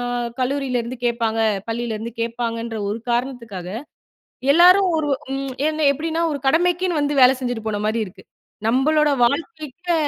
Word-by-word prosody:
அ - - -3 0.4
கல்லூரியிலருந்து 255 -2 -1
கேப்பாங்க! 230 -2 0 0.3
பள்ளிலருந்து 230 -1 -3
கேட்பாங்கன்ற, 230 0 -3
ஒரு 210 +3 -2
காரணத்துக்காக, 235 -7 -3 0.8
எல்லாரும் 365 +4 +6
ஒரு 300 - -1 0.3
ம் 270 -1 -3 0.2
என்ன 310 -1 -1
எப்படின்னா, 325 +3 -2
ஒரு 285 - -3
கடமைக்குன்னு 350 +1 +2
வந்து 290 -1 +1
வேலை 255 +1 +7
செஞ்சுட்டு 245 -3 -3
போன 205 -1 -2
மாரி 225 +2 0
இருக்கு. 185 - -14 0.4
நம்பளோட 295 +5 +3
வாழ்க்கைக்கு 315 +4 -2
255 Hz, 130 wpm, -21 LUFS, 230-310 Hz, 0.8 s, வேலை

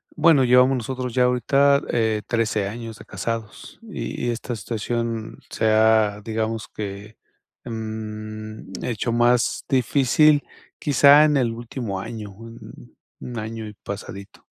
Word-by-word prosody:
Bueno, 155 -4 +5
llevamos 125 +2 +5
nosotros 125 0 -4
ya 125 -1 +4
ahorita, 140 +3 +3
eh, 110 -2 +1
13 110 -4 0
años 115 0 -7
de - - -12
casados, 110 +3 -5
y 215 - -5
y 120 - +1
esta 120 +1 -4
situación 115 +1 -3
se 110 - 0
ha, 110 -1 +3
digamos 110 0 -3
que, 105 +1 -7 0.5
mm, 110 -2 -7
hecho 120 0 -2
más 120 +1 +2
difícil, 140 +3 +3 0.4
quizá 145 +1 +6
en 150 -2 +3
el 120 -3 +1
último 115 -3 -5
año, 105 0 -7
1 115 - -13 0.4
año 110 0 -5
y 105 - -8
pasadito. 100 0 -9
115 Hz, 130 wpm, -23 LUFS, 110-125 Hz, 0.5 s, quizá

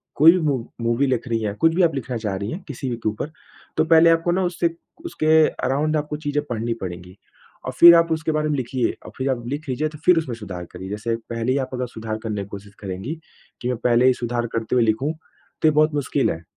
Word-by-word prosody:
कोई 155 +3 +8
भी 180 - +1
मू 140 -3 +2 0.2
मूवी 120 +4 +1
लिख 125 -1 -1
रही 115 -2 0
हैं, 105 -2 -2
कुछ 165 +7 +3
भी 185 - +2
आप 160 -4 +2
लिखना 125 -2 -3
चाह 105 -4 -3
रहीं 100 +2 -4
हैं 180 - -5
किसी 135 -2 -5
भी 120 - -2
के 115 - -1
ऊपर, 110 +8 -5 0.5
तो - - +3
पहले 165 +1 +6
आपको 165 +1 +2
ना 185 +2 +1
उससे 175 -1 0 0.4
उसके 240 - -2 0.4
अराउंड 150 +4 +1
आपको 150 0 -3
चीज़ें 145 0 0
पढ़नी 115 0 -2
पड़ेंगी। 90 +1 -7 0.5
और - - -2
फिर 170 0 +11
आप 165 0 +3
उसके 160 0 0
बारे 155 0 0
में 150 - +1
लिखिए 125 -1 -1
और - - -9
फिर 130 +1 -1
आप 125 -3 -1
लिख 145 +4 -4
लीजिए 140 +4 0
तो 150 - -11
फिर 180 -2 +6
उसमें 130 -8 -1
सुधार 95 -6 -7
करिए। 95 +2 -8
जैसे 110 +3 -2
पहले 115 +1 -1
ही 135 - +1
आप - - -19
अगर 125 0 -2
सुधार 110 -2 -5
करने 105 -3 -3
की - - -11
कोशिश 100 0 -10
करेंगी, 100 - -5 0.4
कि 125 - -3
मैं 125 - -1
पहले 120 +1 +3
ही 130 - +6
सुधार 120 -1 -2
करते 115 +1 -1
हुए 120 - +4
लिखूँ, 130 +8 0
तो 160 0 -5
ये - - +6
बहुत 155 +1 +3
मुश्किल 140 -1 0
है। 80 +1 -6
130 Hz, 250 wpm, -22 LUFS, 115-155 Hz, 0.5 s, फिर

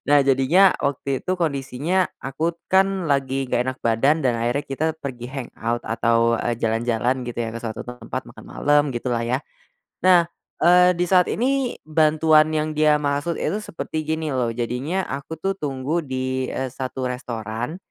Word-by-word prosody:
Nah 145 -1 +5
jadinya 140 +9 +5
waktu 140 -1 -1
itu 185 - -2
kondisinya 155 +2 0 0.2
aku 155 +5 -2 0.2
kan 190 -4 +2
lagi 135 -1 +1
gak 125 +1 +1
enak 130 0 -3
badan 135 +7 +2
dan 120 -3 +1
akhirnya 120 +5 0
kita 140 +4 -2 0.2
pergi 125 -3 -5
hang 135 -3 -6
out 120 +1 -1
atau, 115 0 +2
eee, 120 - -1
jalan-jalan 115 +2 0
gitu 120 - -6
ya 115 - -3
ke 115 - -5
suatu 110 -2 -5
tempat 125 0 -6
makan - - -13
malam 145 0 +2
gitu 120 +1 -2
lah 115 0 0
ya. 125 +2 +1 0.6
Nah, 180 -1 +6 0.4
eee, 180 +1 +6
di 175 - +1
saat 180 0 +4
ini, 260 +2 0
bantuan 155 0 +4
yang 155 0 0
dia 150 0 +4
maksud 145 +3 -1
itu 205 - -1
seperti 155 -5 -5
gini 160 -1 -1
loh 125 -3 0
jadinya 130 +10 -2
aku 140 +4 -5
tuh 195 +5 -1
tunggu 145 +2 -2
di, 130 -2 -2
eee, 130 -1 -3
1 130 0 -4
restoran, 120 +2 -4
140 Hz, 170 wpm, -22 LUFS, 125-160 Hz, 0.6 s, Nah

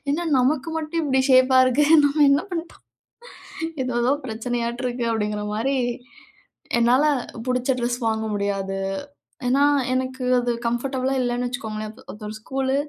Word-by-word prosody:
என்ன 335 +4 -1
நமக்கு 275 +4 +1
மட்டும் 320 +1 -2
இப்டி 265 -2 +2
ஷேப்பா 260 0 +6
இருக்கு? 270 +4 +3 0.2
நம்ம 290 +1 +3
என்ன 280 - +3
பண்ணிட்டோம்? 335 0 -6 1.0
ஏதோ 255 -1 -3
ஏதோ 260 +3 +3
பிரச்சனையாட்டு 235 +2 -3
இருக்கு 245 -1 -3
அப்டிங்கிற 210 -1 -2
மாரி, 265 +5 0 1.0
என்னால 245 +5 +4 0.4
புடிச்ச 255 +1 +1
ட்ரெஸ் 240 +1 -1
வாங்க 220 0 -1
முடியாது, 195 -1 -2 0.7
ஏன்னா 270 +3 +3 0.3
எனக்கு 260 0 -2 0.2
அது 245 0 0
கம்ஃபர்டபுளா 260 +2 -1
இல்லைன்னு 245 0 -1
வச்சுக்கோங்களேன், 215 -3 -5 0.2
ஒரு 210 - -13
ஒரு 215 - -6
ஸ்கூலு, 265 +3 -1
250 Hz, 135 wpm, -23 LUFS, 235-270 Hz, 1.0 s, ஷேப்பா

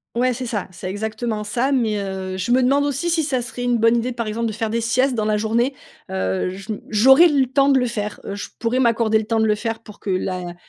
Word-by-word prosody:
Ouais, 250 +1 +2
c'est 250 +1 -5
ça. 210 -4 -3
C'est 185 +1 -7
exactement 215 +2 -3
ça. 240 +6 -1
Mais, 230 -6 +1
heu, 190 -1 -4
je 190 +6 -2
me 255 +1 +4
demande 275 +3 +3
aussi 290 +4 -1
si 325 -2 +1
ça 260 -4 -1
serait 245 +1 -6
une 245 -1 +2
bonne 230 +1 +4
idée, 245 +2 -1
par 235 -1 -4
exemple, 225 +2 -2
de - - -2
faire 225 0 -3
des 230 +1 0
siestes 255 +4 +1
dans 220 -3 -1
la 215 0 +1
journée. 235 +5 0 0.3
Heu, 95 - -1
je 195 +3 -7
m - - -8
j'aurais 265 +10 +7
le 285 -4 +2
temps 275 +2 +2
de 275 - +5
le 250 - +1
faire, 210 -3 -4
heu, - - -4
je 205 - -6
pourrais 235 +3 0
m'accorder 230 -3 +3
le 215 - -4
temps 225 +1 0
de 220 - +3
le 215 - +3
faire 225 +1 -3
pour 210 - -13
que - - -6
la 185 -1 -2
230 Hz, 270 wpm, -21 LUFS, 210-255 Hz, 0.3 s, j'aurais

